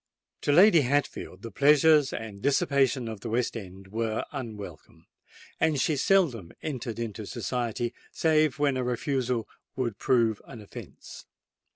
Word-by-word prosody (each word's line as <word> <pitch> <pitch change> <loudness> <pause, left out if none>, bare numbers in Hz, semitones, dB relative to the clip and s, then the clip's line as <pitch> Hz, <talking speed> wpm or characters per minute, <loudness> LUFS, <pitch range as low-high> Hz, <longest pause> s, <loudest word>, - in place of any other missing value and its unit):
To - - +1
Lady 175 +2 +7
Hatfield 135 -7 -2
the 115 - -7
pleasures 150 +3 +5
and 105 -3 -7
dissipation 135 -2 +2
of 110 -2 -6
the 115 - -6
West 120 +2 0
End 95 -3 -9
were 110 +1 -2
unwelcome; 100 - -8 0.5
and 155 -3 +2
she 155 - +1
seldom 135 - +2
entered 125 -7 -4
into 110 -3 -5
society, 120 0 -3 0.2
save 155 -2 +2
when 145 -3 +1
a 130 - -1
refusal 125 -1 -1 0.3
would 120 -6 -3
prove 115 -4 +2
an 120 - -10
offence. 105 - -11
120 Hz, 140 wpm, -27 LUFS, 110-140 Hz, 0.5 s, Lady